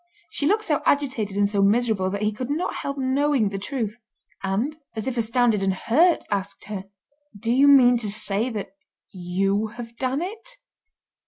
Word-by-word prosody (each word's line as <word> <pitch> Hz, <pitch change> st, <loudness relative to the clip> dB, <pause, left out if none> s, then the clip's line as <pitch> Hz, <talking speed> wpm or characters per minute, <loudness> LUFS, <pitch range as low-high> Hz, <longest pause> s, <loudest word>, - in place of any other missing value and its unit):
She 285 Hz, -, -1 dB
looked 430 Hz, +5 st, +2 dB
so 300 Hz, -8 st, 0 dB
agitated 255 Hz, -9 st, 0 dB
and 205 Hz, 0 st, +3 dB
so 200 Hz, -1 st, 0 dB
miserable 205 Hz, -2 st, +2 dB
that 200 Hz, +2 st, -3 dB
he 210 Hz, -, +2 dB
could 250 Hz, +4 st, -6 dB
not 310 Hz, +5 st, -2 dB
help 280 Hz, 0 st, -4 dB
knowing 265 Hz, -3 st, +1 dB
the 195 Hz, 0 st, -5 dB
truth, 225 Hz, -1 st, -4 dB, 0.4 s
and, 205 Hz, +10 st, -1 dB, 0.2 s
as 220 Hz, -, -3 dB
if 260 Hz, -, -2 dB
astounded 230 Hz, -2 st, +2 dB
and 195 Hz, -1 st, +1 dB
hurt, 325 Hz, -, +3 dB
asked 200 Hz, -1 st, -2 dB
her: 195 Hz, -2 st, -6 dB, 0.5 s
"Do 230 Hz, +3 st, -1 dB
you 270 Hz, +4 st, +5 dB
mean 250 Hz, -3 st, +7 dB
to 220 Hz, -3 st, -1 dB
say 210 Hz, +3 st, +1 dB
that 215 Hz, -4 st, -5 dB, 0.4 s
you 195 Hz, +3 st, -1 dB
have 230 Hz, -1 st, -8 dB
done 265 Hz, +4 st, -1 dB
it?" 450 Hz, +6 st, -6 dB
230 Hz, 175 wpm, -24 LUFS, 200-275 Hz, 0.5 s, mean